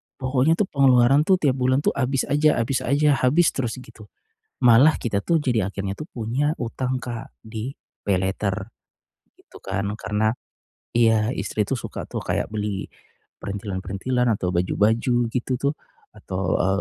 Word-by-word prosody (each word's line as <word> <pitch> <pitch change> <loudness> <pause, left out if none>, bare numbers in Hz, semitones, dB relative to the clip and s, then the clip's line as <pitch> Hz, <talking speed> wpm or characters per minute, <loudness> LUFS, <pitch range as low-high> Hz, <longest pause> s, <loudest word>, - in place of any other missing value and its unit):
pokoknya 130 +4 +2
tuh 210 - +1
pengeluaran 135 +1 +4
tuh 190 - +6
tiap 140 -7 0
bulan 130 +2 +2
tuh - - +3
habis 135 0 0
aja 150 +1 +4
habis 120 +3 0
aja, 145 +3 +2
habis 155 +7 +3
terus 120 -5 -3
gitu. 110 -3 -15 0.5
Malah 125 +6 +6
kita 100 -4 -1
tuh 165 -2 +2
jadi 110 -8 0
akhirnya 100 0 -4
tuh - - -6
punya 125 +6 -1
hutang 125 +2 -2
Kak, 120 -2 -7
di 110 +4 -6 0.3
paylater, 100 +1 -1 0.7
gitu - - -17
kan. 100 +1 -3
Karena 105 +1 0 0.6
iya, 115 0 +3
istri 105 -2 -2
tuh 135 - -2
suka - - -6
tuh - - -5
kayak 105 - -2
beli, 105 -2 -2 0.6
perintilan-perintilan, 100 +5 -2
atau 90 -2 -2
baju-baju 110 +7 +1 0.2
gitu 125 +1 -2
tuh, 140 +3 0 0.4
atau 95 -4 -2
e - - +1
120 Hz, 150 wpm, -23 LUFS, 105-135 Hz, 0.7 s, tuh